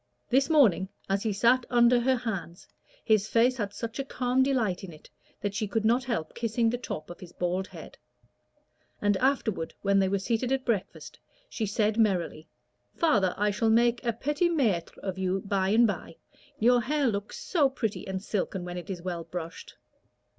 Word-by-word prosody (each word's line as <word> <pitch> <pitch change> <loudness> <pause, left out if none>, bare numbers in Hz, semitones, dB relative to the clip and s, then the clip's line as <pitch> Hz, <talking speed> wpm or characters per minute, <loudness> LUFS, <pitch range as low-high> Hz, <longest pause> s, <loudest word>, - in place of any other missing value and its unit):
This 270 +4 +3
morning, 215 - +4 0.2
as 195 0 0
he 220 - -1
sat 235 +5 +3
under 240 0 +5
her 260 +2 +2
hands, 195 -8 -5 0.4
his 215 -2 +3
face 245 +3 +3
had 205 -3 -2
such 230 +3 -6
a - - 0
calm 255 -1 0
delight 245 -10 +1
in 190 - -7
it 155 - -16 0.3
that 205 -1 -2
she 215 +1 -2
could 220 +2 -1
not 245 +3 +3
help 220 -11 -3
kissing 230 0 0
the 245 - -1
top 155 -8 -6
of 175 - -10
his 180 -2 -11
bald 180 +2 -2
head; - - -12 1.0
and 205 -1 +2
afterward, 220 -9 0
when 200 0 +3
they 190 -1 +2
were 200 - +1
seated 230 +5 -1
at 270 -1 0
breakfast, 215 -6 -3 0.3
she 220 - -2
said, 210 +2 0
merrily 180 -7 0 0.5
"Father, 205 - +2
I 210 +1 +2
shall 220 +3 +1
make 235 +1 +3
a 235 - +1
petit 295 +9 0
maître 230 - 0
of 190 -1 -5
you 190 +1 0
by 195 -1 0
and 225 +3 +5
by; 190 -6 -3 0.4
your 245 +2 +4
hair 290 +4 0
looks 205 -4 -2
so 300 -7 +2
pretty 225 -7 -3
and 190 0 -4
silken 190 -3 -2
when 180 0 -5
it 175 - -11
is 180 -3 -5
well 175 -2 -4
brushed." 170 -2 -7
215 Hz, 190 wpm, -28 LUFS, 190-245 Hz, 1.0 s, under